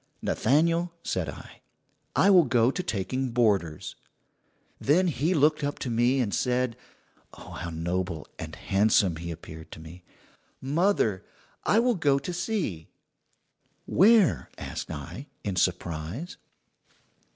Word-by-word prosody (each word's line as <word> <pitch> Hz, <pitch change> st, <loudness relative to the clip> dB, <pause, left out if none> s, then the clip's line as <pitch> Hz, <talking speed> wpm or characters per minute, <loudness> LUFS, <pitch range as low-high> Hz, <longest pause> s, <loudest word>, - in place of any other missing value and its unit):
"'Nathaniel,' 165 Hz, +7 st, +2 dB
said 90 Hz, -5 st, -2 dB
I, -, -, -11 dB, 0.5 s
'I 195 Hz, -, +5 dB
will 180 Hz, -4 st, +7 dB
go 120 Hz, -1 st, +3 dB
to 180 Hz, -, -3 dB
taking 130 Hz, -, -2 dB
boarders.' 100 Hz, -10 st, 0 dB, 0.9 s
"Then 165 Hz, +7 st, +3 dB
he 160 Hz, +5 st, 0 dB
looked 150 Hz, 0 st, +3 dB
up 145 Hz, 0 st, -2 dB
to 125 Hz, -, -4 dB
me 120 Hz, +3 st, +2 dB
and 110 Hz, -5 st, 0 dB
said 125 Hz, -1 st, 0 dB, 0.6 s
oh, -, -, -12 dB
how 85 Hz, -, -5 dB
noble 85 Hz, 0 st, -3 dB
and -, -, -6 dB
handsome 100 Hz, -3 st, +2 dB
he 85 Hz, +1 st, -6 dB
appeared 80 Hz, -1 st, -9 dB
to -, -, -10 dB
me: 80 Hz, +3 st, -12 dB, 0.6 s
"'Mother, 140 Hz, -, +1 dB, 0.4 s
I 210 Hz, -, +3 dB
will 245 Hz, +2 st, +4 dB
go 145 Hz, -8 st, +2 dB
to 175 Hz, +6 st, -4 dB
sea.' 175 Hz, -, -2 dB, 1.0 s
"'Where?' 210 Hz, -1 st, +4 dB
asked -, -, -6 dB
I, 75 Hz, -, -7 dB, 0.2 s
in 100 Hz, -2 st, -2 dB
surprise. 90 Hz, -, -2 dB
125 Hz, 130 wpm, -27 LUFS, -, 1.0 s, will